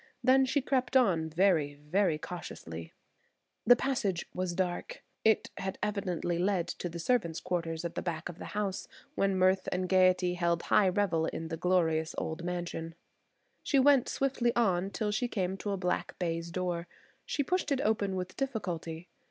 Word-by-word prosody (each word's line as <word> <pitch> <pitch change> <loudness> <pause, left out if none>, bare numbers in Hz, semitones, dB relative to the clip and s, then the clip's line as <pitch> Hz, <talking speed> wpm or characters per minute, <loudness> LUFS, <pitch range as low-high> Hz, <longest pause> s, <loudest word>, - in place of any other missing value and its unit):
Then 265 0 +5
she 285 +2 +1
crept 260 -1 +2
on 175 -10 +2
very, 160 -4 +2
very 155 +3 +1
cautiously. 80 - -7 0.8
The 245 - +9
passage 235 -9 -1
was 180 -1 -2
dark. 180 -1 -3 0.2
It 220 -1 +3
had 190 0 -4
evidently 185 -5 -1
lead 185 -2 +1
to 175 - -3
the 170 - -7
servants' 170 -3 0
quarters 165 -2 -2
at 170 - -3
the - - -3
back 170 -1 -3
of 175 -1 -9
the - - -8
house 200 -2 -2 0.3
when 195 -1 +1
mirth 185 +1 +3
and 180 0 -1
gaiety 185 -1 +4
held 170 -1 0
high 200 -3 +4
revel 180 -4 +1
in 165 0 -4
the 165 - -2
glorious 160 -2 +1
old 160 +2 -3
mansion. 175 -2 -4 0.7
She 280 - +1
went 275 -1 +5
swiftly 255 -3 0
on, 195 -5 +2
till 210 +1 -2
she 230 +4 0
came 190 -5 -1
to 205 - -4
a 200 - 0
black 180 -1 -2
baize 170 -1 -2
door. 175 -1 -2 0.4
She 285 - -1
pushed 360 +1 -1
it 275 -1 +2
open 205 -5 +1
with 185 0 -4
difficulty. 180 - -3
185 Hz, 170 wpm, -31 LUFS, 170-210 Hz, 0.8 s, The